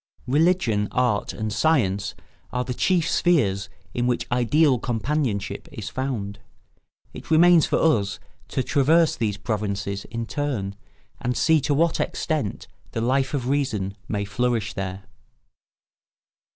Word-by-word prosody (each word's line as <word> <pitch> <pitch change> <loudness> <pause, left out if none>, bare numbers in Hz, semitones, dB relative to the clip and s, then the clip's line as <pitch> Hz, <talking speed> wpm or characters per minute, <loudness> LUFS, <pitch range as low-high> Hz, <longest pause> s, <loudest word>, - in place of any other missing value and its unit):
Religion, 140 - +2
art, 125 -5 +1
and 110 -1 -4
science 100 -5 +1 0.4
are 125 0 -1
the 125 - -3
chief 170 +4 +2
spheres 105 - +2 0.2
in 120 0 0
which 120 -1 0
ideal 125 +3 +3
companionship 120 -3 -2
is 110 0 -6
found. 110 -7 -3 0.7
It - - -10
remains 170 0 +6
for - - +1 0.2
us 100 +1 -5 0.3
to 130 - -1
traverse 155 +5 +3
these 105 -4 -1
provinces 100 -2 -3
in 115 -1 -4
turn 120 -8 -2 0.5
and 125 0 -2
see 160 -1 +4
to 145 +1 +1
what 165 +2 +2
extent 150 -11 -2 0.3
the 115 - -2
Life 130 +4 +1
of 125 -3 -2
Reason 110 -9 -1
may 100 -1 -2
flourish 110 +1 -1
there. 95 -1 -5
120 Hz, 130 wpm, -24 LUFS, 105-145 Hz, 0.7 s, remains